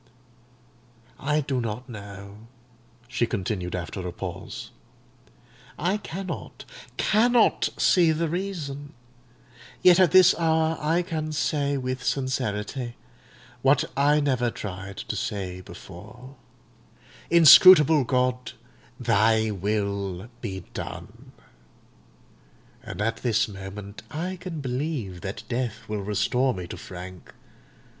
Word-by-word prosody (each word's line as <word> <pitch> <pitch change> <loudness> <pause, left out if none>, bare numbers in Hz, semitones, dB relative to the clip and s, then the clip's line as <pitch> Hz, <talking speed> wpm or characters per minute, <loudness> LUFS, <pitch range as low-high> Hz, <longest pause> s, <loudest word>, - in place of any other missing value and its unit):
"I 150 +2 +1
do 135 -3 -2
not 115 +3 -4
know," 100 -1 -10 0.6
she 120 -1 0
continued 95 -4 -3
after 90 +1 -5
a - - -4
pause: 90 0 -7 1.1
"I 180 +6 0
cannot—cannot 215 - 0
see 170 -3 +4
the 165 +1 0
reason; 155 -6 -5 0.9
yet 180 0 +7
at 185 -3 +6
this 185 +2 +7
hour 160 -1 +2
I 165 +4 +1
can 160 -3 -3
say 145 -2 0
with 130 -1 -3
sincerity, 125 -2 -2 0.7
what 135 +1 +4
I 145 +2 +4
never 130 -4 +1
tried 100 -2 -7
to - - -5
say 95 -3 -4
before, 105 +9 -12 0.9
Inscrutable 160 -2 +8
God, 125 0 0 0.5
Thy 110 +1 +3
will 100 0 -2
be 95 -5 -5
done! - - -8 1.5
And 105 - -5
at 115 +1 -1
this 110 -3 +1
moment 100 0 -9
I 175 +4 -4
can 175 -4 -6
believe 125 - -3
that 100 +2 -6
death 120 -2 -3
will 105 -1 -3
restore 105 +6 +1
me 90 -1 -5
to - - -6
Frank. 90 -1 -10
125 Hz, 105 wpm, -25 LUFS, 100-155 Hz, 1.5 s, Inscrutable